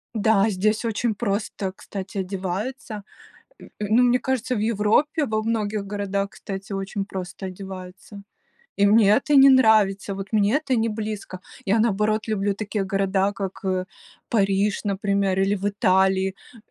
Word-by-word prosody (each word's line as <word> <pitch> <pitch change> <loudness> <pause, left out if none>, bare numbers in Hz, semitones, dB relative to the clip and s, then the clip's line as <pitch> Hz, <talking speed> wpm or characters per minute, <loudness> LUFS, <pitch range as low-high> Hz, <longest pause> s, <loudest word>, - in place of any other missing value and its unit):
Да, 215 0 +3
здесь 215 +4 0
очень 225 0 0
просто, 200 -2 -2
кстати, 195 0 -8
одеваются. 200 +5 -4 0.6
Э, - - -12
ну, 215 +4 +2
мне 250 0 +4
кажется, 255 -2 -1
в - - -1
Европе 230 - +1
во 215 0 -1
многих 215 -2 -1
городах, 200 -1 -2
кстати, 195 +1 -7
очень 195 +1 -3
просто 190 0 -6
одеваются. 190 +1 -9 0.6
И 200 - +4
мне 205 0 +5
это 290 +7 +3
не 275 0 +8
нравится. 215 -6 +4
Вот 195 +2 -7
мне 210 +4 +3
это 285 -4 0
не 225 0 +1
близко. 210 -3 -5 0.3
Я, 205 +3 +2
наоборот, 215 0 +1
люблю 205 -2 0
такие 205 0 -3
города, 195 0 0
как, 195 -1 -6
э, 185 -1 -1 0.4
Париж, 200 -1 +1
например, 200 -1 0
или 195 +1 +2
в 195 +1 -5
Италии, 190 -1 +2 0.2
э, - - -15
205 Hz, 150 wpm, -23 LUFS, 195-220 Hz, 0.6 s, не